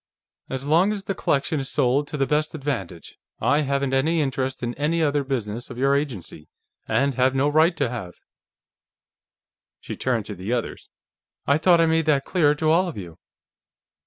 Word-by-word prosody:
"As 130 +1 -4
long 170 +7 +3
as 205 -2 -4
the 195 - -2
collection 145 -3 0
is 135 0 -4
sold 140 +1 +1
to 150 - -5
the 135 - +2
best 150 +2 0
advantage, 100 - -5 0.2
I 145 - +2
haven't 140 -1 -1
any 155 +5 +2
interest 135 -2 -2
in 120 0 -2
any 150 +5 -1
other 145 -1 +1
business 120 -4 -4
of 125 - -9
your 135 +2 +2
agency, 115 - -4 0.4
and 135 +5 +1
have 130 +1 +2
no 135 +2 +2
right 160 +4 +3
to 140 - +1
have." 115 -7 -6 1.6
She - - -7
turned 120 -5 -1
to 105 - -6
the 95 +5 -4
others. 120 -2 -4 0.6
"I 140 +2 +3
thought 170 +1 +5
I 165 - +5
made 160 -1 +1
that 140 -3 +2
clear 150 -5 +2
to 155 +1 +1
all 180 +3 +3
of 170 - -6
you." 85 -5 -9
140 Hz, 185 wpm, -23 LUFS, 125-155 Hz, 1.6 s, thought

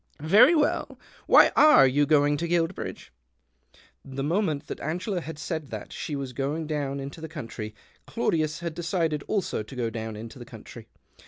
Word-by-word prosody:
"Very 210 - +6
well. 300 -1 0 0.3
Why - - +7
are 300 - +7
you 140 +2 +2
going 145 -1 +4
to 170 - -2
Guilbridge? 170 +1 -2 0.5
" 60 0 -30
The 135 - -1
moment 155 -2 0
that - - -7
Angela 180 +4 -3
had 160 -1 -7
said 155 -1 -4
that - - -8
she 150 - -4
was 135 -2 -5
going 145 +5 -2
down 145 -2 -3
into 140 +4 -7
the 160 - -7
country 115 -8 -7 0.3
Claudius 155 0 -1
had 170 -2 -4
decided 165 -3 -1
also 195 - -1
to 110 +5 -10
go 120 -2 -2
down 110 -1 -5
into 115 +5 -9
the - - -7
country. - - -12
150 Hz, 175 wpm, -26 LUFS, 135-170 Hz, 0.5 s, Why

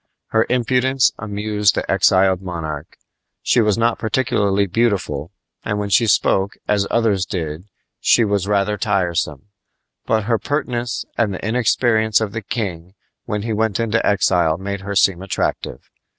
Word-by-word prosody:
Her 110 0 +2
impudence 125 +1 +2
amused 105 -1 0
the - - -2
exiled 95 -1 +3
monarch. 80 -5 -6 0.5
She 120 - +3
was 105 -2 +2
not 115 0 +1
particularly 105 -4 +1
beautiful, 95 -7 -1 0.3
and 105 - -2
when 100 -1 -3
she 115 +3 +4
spoke 100 -1 +2
as 100 -1 +1
others 110 -5 +1
did 85 -3 -5 0.3
she 115 - +4
was 100 -2 -1
rather 105 0 +1
tiresome; 85 -3 -1 0.6
but 110 -1 +1
her 115 +1 0
pertness 125 -5 -2
and 105 -5 +1
the 95 - -5
inexperience 110 -2 +2
of 110 -3 -2
the 110 +1 -4
king 95 -5 -5 0.3
when 105 -3 -3
he 115 0 -2
went 110 -1 0
into 115 0 0
exile 90 -5 +2
made 100 +1 -5
her 100 +1 -5
seem 95 -2 +3
attractive. 95 -3 -3
105 Hz, 150 wpm, -19 LUFS, 95-115 Hz, 0.6 s, she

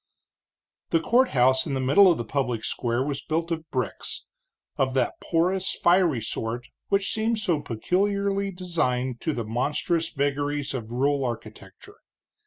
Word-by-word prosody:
The 165 - +3
courthouse 135 - +3
in 140 - -1
the - - -1
middle 145 +9 +6
of 170 - +1
the 120 - -4
public 125 -5 -1
square 120 +2 -1
was 140 -1 -3
built 165 +2 -2
of 160 -1 -3
bricks, 125 -7 -3 0.5
of 130 -1 0
that 125 -2 0
porous, 180 +3 +1
fiery 175 -8 +3
sort 115 +3 -4 0.2
which 195 0 +1
seem 220 +1 0
so 180 -8 0
peculiarly 200 - 0
designed 130 -10 -1
to 160 - 0
the 120 -6 -3
monstrous 145 +8 -1
vagaries 145 0 -1
of 115 -4 -5
rural 140 +3 +1
architecture. 120 -3 -7
145 Hz, 145 wpm, -26 LUFS, 125-180 Hz, 0.5 s, middle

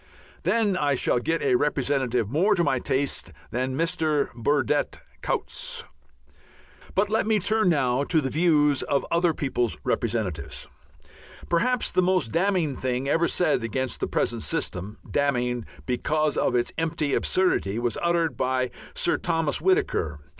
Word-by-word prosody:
Then 215 -4 +2
I 145 -5 +1
shall 125 - +1
get 165 +6 -1
a 135 - +2
representative 130 -4 +1
more 175 - +2
to 175 - +2
my 130 -5 +1
taste 135 -8 -2 0.2
than 130 +2 -2
Mr. 160 -3 0
Burdett 145 +4 0 0.2
Coutts. - - -2 1.1
But 205 +1 +2
let 220 -1 +1
me 220 -1 +3
turn 210 0 +2
now 135 -4 +2
to 160 - +3
the 135 -3 -2
views 150 -3 +3
of 140 -1 0
other 170 0 +3
people's 125 -4 -1
representatives. 105 -10 -2 0.8
Perhaps 245 +9 +1
the - - +3
most 180 -10 +1
damning 175 -5 +1
thing 130 +1 -2
ever 165 +4 +2
said 175 -9 +1
against 130 +3 -2
the - - -1
present - - -1
system, 100 +5 -3
damning 125 -4 0 0.2
because 150 +4 0
of - - +1
its 120 - +1
empty 155 -3 -1
absurdity, 145 - +1
was 120 0 0
uttered 170 -4 +1
by 130 +1 0 0.2
Sir - - +1
Thomas 165 -3 -1
Whittaker. 85 - +1
145 Hz, 145 wpm, -25 LUFS, 125-170 Hz, 1.1 s, me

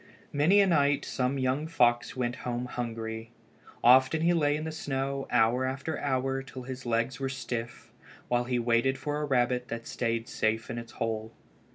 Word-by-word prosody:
Many 165 +8 +5
a - - +5
night 145 -5 +2
some 130 +1 -1
young 135 +4 0
fox 120 -7 +2
went 125 -1 -2
home 120 0 -3
hungry. 115 -2 -5 0.5
Often 130 +6 +6
he 175 +1 +4
lay 145 -3 +2
in 155 - -3
the 160 - -3
snow 135 -3 -3
hour 120 +2 +3
after 135 +4 -3
hour 135 -1 0
till 135 -1 -9
his 130 0 -7
legs 115 +2 0
were 135 -1 -1
stiff, 120 -3 -5 0.3
while 120 0 +1
he 125 0 0
waited 120 +3 +2
for 150 0 -3
a - - 0
rabbit 125 -2 +1
that 115 0 -5
stayed 115 -1 -2
safe 110 -1 -1
in 120 - -3
its 115 0 -10
hole. 110 0 -3
125 Hz, 180 wpm, -29 LUFS, 120-140 Hz, 0.5 s, Often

